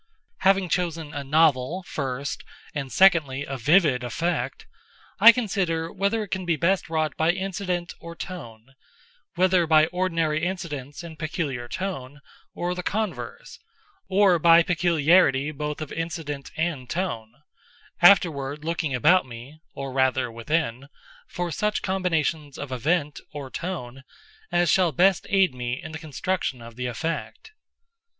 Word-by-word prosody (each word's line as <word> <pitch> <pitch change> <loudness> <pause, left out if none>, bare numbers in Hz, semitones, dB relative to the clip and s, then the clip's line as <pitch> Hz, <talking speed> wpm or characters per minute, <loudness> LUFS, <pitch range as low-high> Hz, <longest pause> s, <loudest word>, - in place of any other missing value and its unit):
Having 195 -1 +3
chosen 165 -4 -2
a 145 - -4
novel, 155 +3 +2
first, 140 -4 -4 0.3
and 140 -3 -4
secondly 150 -8 +4
a 135 - -5
vivid 145 0 +3
effect, 170 - -2 0.5
I 230 - +11
consider 190 -9 -2
whether 200 +3 0
it 205 - -10
can 190 0 -2
be 170 -2 +1
best 175 +4 +1
wrought 155 -1 -1
by 160 +1 +2
incident 180 -1 -2
or 170 0 -9
tone—whether 170 - -3
by 155 -1 +6
ordinary 165 -3 -1
incidents 155 -5 -4
and 160 -2 -10
peculiar 150 -6 -3
tone, 145 -4 -5 0.4
or 175 +1 -2
the 180 - -4
converse, 220 - -4 0.5
or 190 -2 +4
by 165 +1 +6
peculiarity 165 -4 +3
both 150 +1 -5
of 155 - -6
incident 160 -4 -5
and 155 -6 -2
tone—afterward 150 - 0
looking 160 -4 -1
about 155 +5 +4
me 125 +6 -11 0.2
(or 135 -1 -5
rather 130 -2 +1
within) 125 +1 -2 0.4
for 175 -1 -4
such 210 +7 -1
combinations 165 -6 -1
of 140 -2 -6
event, 150 +4 0
or 140 -3 -7
tone, 135 -8 -6 0.5
as 175 -1 +3
shall 180 -3 +3
best 185 +6 +3
aid 195 -6 +3
me 125 +1 -4
in 160 - -8
the 160 - -6
construction 160 -2 -3
of 115 -1 -11
the 125 +1 -3
effect. 165 - -5
160 Hz, 135 wpm, -25 LUFS, 135-180 Hz, 0.5 s, I